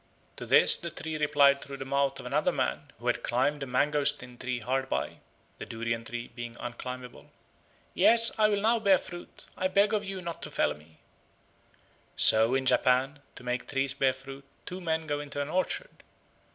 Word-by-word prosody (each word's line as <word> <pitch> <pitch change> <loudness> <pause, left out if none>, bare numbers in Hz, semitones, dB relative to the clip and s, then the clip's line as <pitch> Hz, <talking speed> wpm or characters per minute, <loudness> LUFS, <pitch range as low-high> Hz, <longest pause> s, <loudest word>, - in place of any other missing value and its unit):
To - - -7
this - - +7
the - - -6
tree 160 -1 -6
replied 145 -2 +3
through 140 0 -7
the 135 - -6
mouth 140 0 0
of - - -9
another - - +1
man - - -2
who - - -14
had - - 0
climbed 140 +4 0
a 135 - -4
mangostin 130 -1 +1
tree 125 -1 -3
hard 130 +3 -2
by - - -3 0.4
(the - - -6
durian 115 0 -3
tree 120 +1 -6
being 120 -1 -8
unclimbable), 125 +1 -8 0.6
"Yes, 230 0 +5
I 215 0 +5
will 205 -1 0
now 230 +1 +3
bear 200 -3 +4
fruit; 175 -1 -11
I 185 - 0
beg 200 +3 +2
of 210 -1 0
you 195 -1 -5
not 170 -2 -7
to - - -6
fell - - 0
me." 75 +1 -19 1.2
So 110 +3 +6
in 135 0 0
Japan 130 +3 +2 0.2
to - - -11
make 125 0 -3
trees 135 -1 -1
bear 135 -1 +2
fruit 135 +1 -11 0.2
two 180 +1 -6
men 160 -2 -1
go 145 -1 -2
into 145 -1 -6
an 145 +1 -3
orchard. 185 - -3
140 Hz, 190 wpm, -28 LUFS, 125-165 Hz, 1.2 s, this